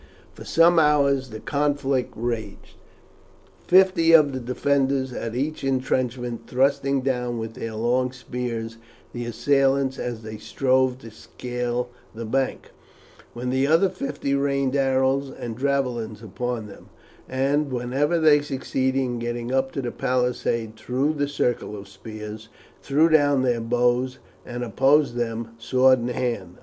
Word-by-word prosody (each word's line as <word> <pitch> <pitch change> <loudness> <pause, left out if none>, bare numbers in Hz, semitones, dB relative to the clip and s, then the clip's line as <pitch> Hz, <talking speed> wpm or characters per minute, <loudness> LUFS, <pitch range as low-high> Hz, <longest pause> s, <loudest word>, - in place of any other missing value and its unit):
For - - -11
some 170 +1 +5
hours 140 -3 +3
the 110 -1 -7
conflict 140 -2 0
raged, 110 -3 -4 0.9
fifty 185 -3 +5
of 150 -4 +6
the 130 - -3
defenders 130 +1 0
at 115 -1 -4
each 145 +4 -2
intrenchment 130 -2 -1
thrusting 135 +1 +1
down 125 -2 -1
with 110 0 -5
their 115 0 -6
long 125 +3 +1
spears 120 -3 -5 0.4
the 120 0 -4
assailants 135 +3 +1
as 120 -2 -4
they 110 0 -7
strove 130 -1 +1
to 115 - -10
scale 125 +2 -4 0.3
the 115 +1 -5
bank, 130 +4 -2 0.6
while 120 +1 -6
the 130 +2 +1
other 165 +5 +4
fifty 140 -4 -3
rained 140 -1 +1
arrows 135 0 +2
and 120 -2 -7
javelins 125 -6 -1
upon 115 +2 -4
them; 100 - -13 0.4
and 140 +2 0
whenever 130 +7 0
they 150 -2 +5
succeeded 135 -2 -1
in 125 -2 -1
getting 120 +1 -3
up 135 0 +1
to 135 - -3
the 120 - -3
palisade 120 -3 -1
through 135 +7 0
the 145 -1 -1
circle 125 -6 -1
of 100 - -8
the 95 - -17
spears, 110 +1 -9 0.3
threw 150 +4 +3
down 145 -4 +4
their 120 -2 +1
bows 125 +2 +1 0.3
and 120 0 -4
opposed 135 +5 +3
them 115 -1 -3
sword 130 +2 +4
in 120 - -3
hand. 115 -8 -3
130 Hz, 145 wpm, -24 LUFS, 120-140 Hz, 0.9 s, of